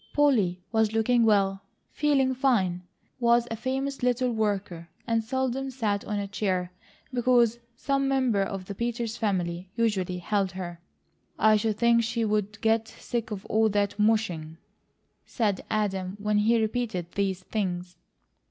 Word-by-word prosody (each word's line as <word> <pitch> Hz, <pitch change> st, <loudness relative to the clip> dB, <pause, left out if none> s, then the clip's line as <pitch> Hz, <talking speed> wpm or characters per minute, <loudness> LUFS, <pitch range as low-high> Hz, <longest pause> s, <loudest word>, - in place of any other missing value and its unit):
Polly 225 Hz, -12 st, +3 dB
was 220 Hz, -1 st, +2 dB
looking 230 Hz, +1 st, +3 dB
well, 195 Hz, -3 st, +2 dB, 0.3 s
feeling 275 Hz, -3 st, +2 dB
fine, 220 Hz, -10 st, +1 dB, 0.4 s
was 235 Hz, 0 st, +3 dB
a -, -, -1 dB
famous 270 Hz, +4 st, -3 dB
little 250 Hz, 0 st, +1 dB
worker, 200 Hz, -6 st, -2 dB, 0.2 s
and 230 Hz, -1 st, +1 dB
seldom 260 Hz, +2 st, -1 dB
sat 215 Hz, -6 st, -1 dB
on 210 Hz, -, -2 dB
a 200 Hz, -1 st, -2 dB
chair 185 Hz, -3 st, -1 dB, 0.4 s
because 240 Hz, -2 st, +3 dB, 0.2 s
some 275 Hz, +2 st, 0 dB
member 260 Hz, -6 st, +2 dB
of 195 Hz, -1 st, -3 dB
the 200 Hz, -, -6 dB
Peters 235 Hz, +1 st, -3 dB
family 180 Hz, -4 st, -2 dB
usually 195 Hz, -6 st, 0 dB
held 195 Hz, +1 st, -1 dB
her. 175 Hz, -2 st, -6 dB, 0.6 s
"I 215 Hz, 0 st, +5 dB
should 215 Hz, 0 st, 0 dB
think 235 Hz, 0 st, +4 dB
she 230 Hz, 0 st, -1 dB
would 210 Hz, -1 st, -1 dB
get 225 Hz, 0 st, +2 dB
sick 235 Hz, -1 st, -4 dB
of 205 Hz, -2 st, -6 dB
all 220 Hz, 0 st, +2 dB
that 205 Hz, 0 st, 0 dB
mushing," 185 Hz, -8 st, +1 dB, 0.7 s
said 210 Hz, -5 st, -1 dB
Adam 195 Hz, -3 st, -1 dB
when 210 Hz, 0 st, +1 dB
he 225 Hz, +2 st, +3 dB
repeated 215 Hz, -6 st, -2 dB
these 190 Hz, -2 st, -1 dB
things. 180 Hz, -3 st, -3 dB
215 Hz, 145 wpm, -27 LUFS, 195-235 Hz, 0.7 s, I